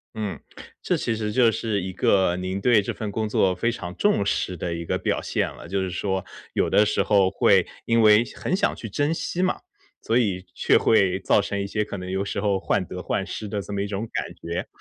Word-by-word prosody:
嗯， 105 -3 -4 0.4
这 - - +1
其 115 - -1
实 110 -1 -2
就 120 -2 +4
是 105 -3 -1
一 95 0 -4
个， 95 -1 +2
您 95 +1 -3
对 115 -2 +4
这 - - -3
份 105 -2 -5
工 110 0 -1
作 95 -3 +2
非 115 +6 0
常 90 -6 -6
重 205 - +2
视 95 -2 -1
的 85 +1 -3
一 85 0 -5
个 - - -1
表 - - -1
现 - - -1
了。 85 - -11
就 95 +1 -1
是 95 - -2
说， 95 +1 -2 0.3
有 - - +1
的 105 - +5
时 105 - +1
候 100 -3 +3
会 - - +3 0.2
因 115 0 +2
为 110 +1 +6
很 185 - -1
想 - - +1
去 115 - -7
珍 145 +10 0
惜 175 - -3
嘛， 185 0 +1 0.4
所 115 +2 +2
以 95 -6 0
却 - - +3
会 95 -3 +3
造 100 - +3
成 100 0 -3
一 - - -3
些 105 +1 -1
可 100 - -6
能 90 0 -6
有 95 +1 -1
时 100 - -3
候 100 -2 +1
患 95 - 0
得 90 - -7
患 95 - -1
失 105 +3 -6
的 100 0 -3
这 100 - -8
么 100 0 -1
一 - - -2
种 105 +3 -4
感 - - -3
觉。 85 +2 -5
100 Hz, 260 characters per minute, -24 LUFS, 95-110 Hz, 0.4 s, 为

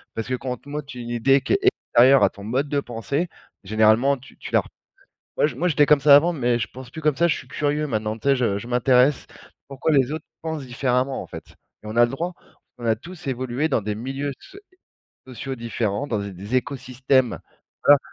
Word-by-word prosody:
Parce 115 - -4
que 130 - -2
quand 130 +1 -6
on 125 - -3
te 140 - -22
montre 145 -2 -6
une 120 -1 -7
idée 135 +4 +3
qui - - -1
est 395 - +3
extérieure 135 - +4
à - - +5
ton 100 - -12
mode 130 +7 -1
de 145 -1 +1
pensée, 140 +6 -3 0.4
généralement 110 +7 +3
tu 130 - -17
tu - - -8
la - - +4
r - - -15 0.7
moi - - +4
je 135 - -7
moi 170 +8 0
j'étais 150 -2 +4
comme 150 -2 +5
ça 140 0 +8
avant 170 +5 +4
mais 120 -5 0
je - - -2
pense 130 -1 -11
plus 160 - -8
comme 150 -2 +2
ça, 170 - +4
je 170 - +1
suis 130 - -9
curieux 150 +2 -1
maintenant, 110 -3 -2
tu 125 - -5
sais, 140 - +5
je 115 -6 0
je 115 - -9
m'intéresse 125 +2 +3 0.4
pourquoi 140 +3 -1
les 135 -2 +3
autres 155 0 -5 0.2
pensent 160 -4 -4
différemment, 125 +1 0
en - - -13
fait - - -11 0.3
et 105 - -11
on 110 - -6
a 120 - +6
le 120 - -6
droit, 170 +6 -3 0.4
on 120 - -8
a 110 -1 +3
tous 175 +7 -12
évolué 130 +3 -1
dans 130 - +1
des 105 +1 -3
milieux 135 +5 -4
soé 390 +1 -13 0.7
sociaux 130 +1 -6
différents, 115 +2 -2
dans 110 -6 -1
des 100 0 -6
des 100 +6 -7
écosystèmes 130 -1 0 0.5
voilà 145 0 +8
130 Hz, 230 wpm, -23 LUFS, 120-145 Hz, 0.7 s, ça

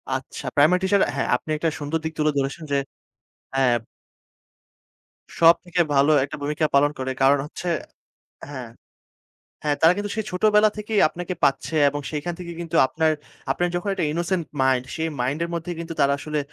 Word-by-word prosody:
আচ্ছা, 130 +1 -4
প্রাইমারি 155 +6 +5
টিচাররা 195 +1 +3
হ্যাঁ 140 - -1
আপনি 125 - -6
একটা 165 +2 0
সুন্দর 150 +2 -2
দিক 160 0 -3
তুলে 155 0 +3
ধরেছেন 140 +4 -2
যে 140 - +3 0.8
হ্যাঁ 130 -3 +3 1.6
সবথেকে 170 +1 +4
ভালো 140 +2 +4
একটা 140 - -5
ভূমিকা 150 +2 0
পালন 145 +1 +4
করে। 130 0 -2
কারণ 135 +1 +5
হচ্ছে 165 +4 -7 0.8
হ্যাঁ। 130 -5 -7 0.9
হ্যাঁ 145 -1 +1
তারা 165 +2 +7
কিন্তু 205 0 -3
সেই 220 -2 -2
ছোটবেলা 210 +3 +4
থেকেই 210 0 -1
আপনাকে 175 +3 -5
পাচ্ছে, 135 +4 +1
এবং 145 +1 -4
সেইখান 155 +3 -3
থেকে 175 -1 -7
কিন্তু 165 -2 -5
আপনার 160 +3 +1 0.4
আপনার 175 - 0
যখন 175 +3 -2
একটা 180 - -1
innocent 170 +1 -1 0.2
mind 130 -1 +2
সেই 160 -1 -1
মাইন্ডের 145 +7 -1
মধ্যেই 170 +1 -4
কিন্তু 165 0 -5
তারা 140 0 +4
আসলে 150 0 -3
160 Hz, 165 wpm, -23 LUFS, 140-175 Hz, 1.6 s, তারা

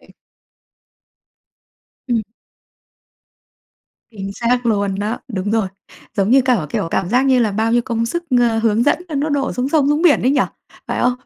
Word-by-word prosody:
rồi. - - -23 2.0
Ừm. 230 -2 +1 1.9
Chính 195 -3 -6
xác 245 +3 0
luôn 200 -3 +1
đó, 210 +3 -2
đúng 195 0 -2
rồi. 220 -3 +1 0.5
Giống 195 +1 +1
như 265 +1 +6
cả 245 - +1
kiểu, - - -2
cảm 175 - -1
giác 250 +4 +3
như 260 -1 +4
là 225 -3 +2
bao 220 +3 0
nhiêu 240 - +3
công 230 -1 -2
sức, 345 +8 -3 0.2
ơ, 230 -2 +2
hướng 225 0 +2
dẫn 290 +6 +2
nó 310 - -6
nó 285 +2 0
đổ 280 -2 -1
xuống 250 +1 -2
sông 285 -2 +2
xuống 295 +2 +1
biển 340 -5 +4
ấy 255 - +3
nhỉ, 280 - +2 0.5
phải - - -2
không? 245 0 +3
235 Hz, 180 wpm, -18 LUFS, 215-265 Hz, 2.0 s, như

